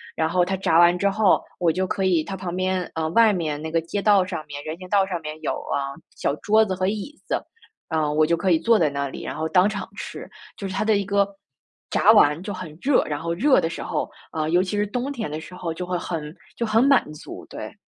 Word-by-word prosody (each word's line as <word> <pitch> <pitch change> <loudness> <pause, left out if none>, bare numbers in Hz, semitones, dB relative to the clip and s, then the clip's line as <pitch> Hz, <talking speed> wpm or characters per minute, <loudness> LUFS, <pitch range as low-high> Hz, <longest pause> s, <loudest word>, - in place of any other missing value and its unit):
然 160 0 0
后 180 0 +2
他 190 +1 -1
炸 165 -3 +3
完 175 +1 +6
之 200 +2 +2
后， 205 -1 +3 0.2
我 175 -2 +3
就 185 +3 -1
可 190 0 -1
以 170 -4 +3
它 195 +2 -6
旁 180 -1 -5
边 185 -1 -1
呃， 160 -1 -1
外 220 +3 +5
面 155 -4 -2
那 160 - -4
个 165 0 +1
街 200 +5 -3
道 200 -3 +5
上 170 -4 -5
面 145 0 -7
人 155 +2 -5
行 185 0 -10
道 200 -2 +3
上 180 -3 -3
面 155 0 -7
有， - - -1 0.2
啊， 140 -1 -1 0.2
小 - - -1
桌 220 +1 +4
子 190 - -2
和 185 0 -1
椅 220 +9 -4
子， - - -1 0.5
呃， 155 -2 0
我 155 +1 +4
就 170 +1 +1
可 190 - 0
以 165 - +5
坐 225 +5 +4
在 155 -3 +3
那 140 -1 -3
里， - - -8
然 - - -5
后 160 +1 -2
当 185 +1 +5
场 210 -1 -4
吃。 - - -7 0.3
就 195 - -4
是 - - -5
它 195 - -1
的 220 -1 +4
一 200 - 0
个 200 0 +2 0.6
炸 - - +5
完 150 +3 +5
就 205 - -4
很 170 -5 -8
热， 275 -1 +3
然 145 -1 -3
后 170 +1 -2
热 265 +10 +4
的 165 - -1
时 - - -6
候 - - -2 0.2
呃， 155 -1 -2
尤 175 +2 +3
其 205 +2 -3
是 205 0 +1
冬 250 +6 -3
天 230 - -4
的 155 +1 -5
时 180 - -11
候 165 -2 -4
就 180 +2 -5
会 180 0 -1
很 160 -3 -5 0.2
就 235 - -1
很 220 +1 +3
满 275 - +4
足， 150 - -10
对。 - - -8
180 Hz, 280 characters per minute, -23 LUFS, 160-200 Hz, 0.6 s, 完